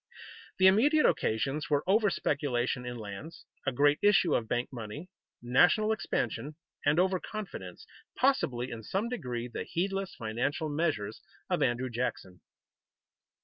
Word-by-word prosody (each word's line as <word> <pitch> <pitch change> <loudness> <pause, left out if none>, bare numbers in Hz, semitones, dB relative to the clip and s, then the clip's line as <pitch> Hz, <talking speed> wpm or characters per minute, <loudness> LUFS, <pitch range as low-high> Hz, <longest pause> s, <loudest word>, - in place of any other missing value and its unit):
The 190 - +4
immediate 270 +11 +5
occasions 135 +7 0
were 145 -1 +2
over 205 +2 +4
speculation 125 -6 -1
in 120 0 -5
lands, 110 +9 -8 0.2
a - - +3
great 145 +3 +3
issue 205 -5 +4
of 110 - 0
bank 120 +3 -2
money, 125 - -7 0.3
national 175 - +4
expansion, 155 -7 -2 0.3
and 145 +3 +3
over 185 0 +2
confidence, 215 0 -7 0.3
possibly 130 - +1
in 115 - -6
some 195 - -2
degree 125 - -4
the 120 - -5
heedless 195 +2 -2
financial 125 +8 -2
measures 145 -9 -1 0.3
of - - +1
Andrew 125 +1 0
Jackson. 105 -7 -4
145 Hz, 135 wpm, -30 LUFS, 120-190 Hz, 0.3 s, immediate